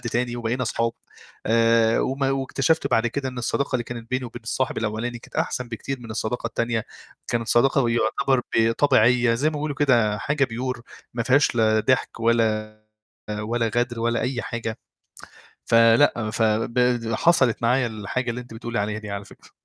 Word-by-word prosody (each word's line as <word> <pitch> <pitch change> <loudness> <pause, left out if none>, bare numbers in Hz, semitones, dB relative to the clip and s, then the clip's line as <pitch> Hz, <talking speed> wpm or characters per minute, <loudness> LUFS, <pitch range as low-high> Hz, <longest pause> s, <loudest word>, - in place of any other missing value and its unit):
تاني 120 0 -2
وبقينا 120 +2 -2
أصحاب 115 -1 -1 0.5
آآ، 115 0 +3
وما 135 +1 0
واكتشفت 135 +3 0
بعد 115 +1 +2
كده 135 +3 -3
إن 125 -1 -7
الصداقة 130 +3 -1
اللي 120 - -4
كانت 120 -1 -8
بيني 130 0 -1
وبين 115 - -9
الصاحب 125 +2 -2
الأولاني 115 +2 -3
كانت - - -13
أحسن 125 -1 -2
بكتير 130 +3 -5
من 115 -2 -10
الصداقة 115 +2 -3
التانية، 115 -1 -2 0.4
كانت 115 -1 -2
صداقة 135 +3 +3
ويعتبر 120 +2 +1 0.2
ب 115 0 +4
طبيعية 125 -2 +3
زي 145 +6 +1
ما 155 - -8
بيقولوا 145 -1 -3
كده 115 -7 +2
حاجة 140 +2 +1
pure 125 +1 -4 0.3
ما 120 - -1
فيهاش 135 +1 +3
لا 110 -1 +3
ضحك 120 0 0
ولا، 110 -2 +1 0.6
ولا 115 +1 -1
غدر 120 -1 0
ولا 115 0 0
أي 125 -1 -2
حاجة، 115 -2 -5 0.9
فلأ 115 0 +4
ف 115 - -1
ب 115 +1 +1
حصلِت 130 -6 +3
معايا 125 +2 +2
الحاجة 110 +3 -3
اللي 125 +2 -4
أنتِ 120 -2 -13
بتقُولِي 120 +1 -4
عليها 105 +1 -2
دي 105 -1 -8
على 100 0 -5
فكرة. - - -18
120 Hz, 170 wpm, -23 LUFS, 115-125 Hz, 0.9 s, ب